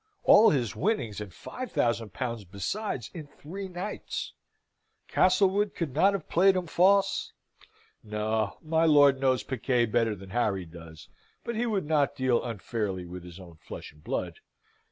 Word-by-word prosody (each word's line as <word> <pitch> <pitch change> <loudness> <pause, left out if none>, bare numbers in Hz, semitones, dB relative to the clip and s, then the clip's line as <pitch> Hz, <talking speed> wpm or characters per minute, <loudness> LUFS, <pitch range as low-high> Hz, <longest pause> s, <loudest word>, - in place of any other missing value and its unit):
All 225 - +7
his 125 -7 0
winnings, 120 - -1
and 105 -3 -7
five 255 - -8
thousand 115 -2 0
pounds 115 -4 -4
besides, 115 - -4
in 155 -4 -8
three 185 +7 -8
nights. 185 +3 -5 0.7
Castlewood 195 +2 +3
could 160 -7 -3
not 190 +8 +4
have 195 -5 -4
played 190 +3 +4
him 185 -1 -1
false? 195 +4 +2 0.7
No. 105 0 -2
My 160 +1 +2
lord 145 -3 +5
knows 130 -2 +2
piquet 125 -1 0
better 115 -1 +1
than 95 -1 -12
Harry 100 -6 0
does, 80 -1 -12 0.4
but 235 - -4
he 240 +2 0
would 200 -7 -1
not 150 -2 +1
deal 130 -2 +1
unfairly 105 -4 -3
with 90 0 -8
his 90 +1 -11
own 85 -3 -13
flesh - - -9
and 75 0 -22
blood. - - -3
130 Hz, 155 wpm, -28 LUFS, -, 0.7 s, All